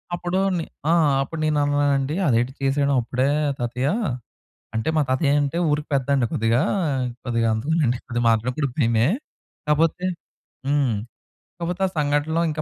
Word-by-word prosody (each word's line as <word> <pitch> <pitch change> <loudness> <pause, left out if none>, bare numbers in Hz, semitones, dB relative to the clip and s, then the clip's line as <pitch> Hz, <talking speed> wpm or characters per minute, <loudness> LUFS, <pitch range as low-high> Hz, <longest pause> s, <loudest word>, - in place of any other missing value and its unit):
అప్పుడు 175 +2 -2 0.2
నే 165 - -2 0.3
ఆ! - - +5 0.3
అప్పుడు 160 +3 -7
నేను 150 -1 +2
అన్నానండి, 145 0 +1
అదేంటి 120 +1 +2
చేసేడం 140 +1 +1
అప్పుడే 130 +3 -1 0.3
తాతయ్య 125 +3 -1 0.9
అంటే, 110 - -1
మా - - +4
తాతయ్య 140 +2 +2
అంటే 145 +4 -2
ఊరికి 150 +1 -1
పెద్దండి. 135 -1 +2
కొద్దిగా 115 +4 +2 0.6
కొద్దిగా 115 -2 +1
అందుకేనండి 130 0 0
కొద్దిగా 120 -1 -2
మాట్లాడేప్పుడు 125 +6 0
కూడా 125 - -14
భయమే! 115 +1 +3 0.6
కాపోతే, 165 +4 +2 0.6
హ్మ్. 140 -5 +2 0.7
కాపోతే 180 +2 -3
ఆ - - -4
సంఘటనలో 150 +3 +1
ఇంకా 155 0 -3
140 Hz, 140 wpm, -23 LUFS, 120-150 Hz, 0.9 s, ఆ